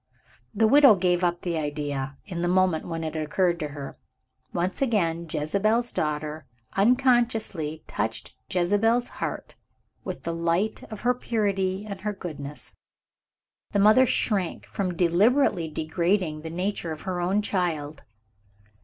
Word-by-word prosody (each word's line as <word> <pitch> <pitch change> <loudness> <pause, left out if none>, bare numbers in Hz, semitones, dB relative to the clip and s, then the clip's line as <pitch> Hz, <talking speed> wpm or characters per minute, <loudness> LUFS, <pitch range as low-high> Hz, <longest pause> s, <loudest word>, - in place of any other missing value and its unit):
The 220 +1 +2
widow 275 -2 +7
gave 180 -1 +1
up 175 0 +1
the 170 -3 -1
idea, 145 -2 -3
in 175 -4 -5
the 175 - +1
moment 180 -2 +2
when 165 -1 -4
it 160 0 -4
occurred 170 +3 +1
to 155 - -2
her. 145 -1 -8 0.5
Once 180 +6 -2
again, 170 -10 +1
"Jezebel's 215 +11 +1
Daughter" 150 0 -3 0.3
unconsciously 225 - +2
touched 110 +2 -3 0.2
Jezebel's 205 +7 +2
heart - - -4 0.5
with - - -6
the 170 - -2
light 170 +6 0
of 215 - -7
her 245 +1 +3
purity 200 -5 -1
and 200 -2 -6
her 210 +1 -2
goodness. 150 -6 -8 1.0
The - - +2
mother 215 +6 +6
shrank 195 -8 0
from 185 -3 -3
deliberately 180 - +3
degrading 160 +1 -1
the 160 - -6
nature 180 0 -2
of 155 - -6
her 185 -2 -3
own 195 +4 +1
child. 155 -7 -2
180 Hz, 135 wpm, -26 LUFS, 160-210 Hz, 1.0 s, widow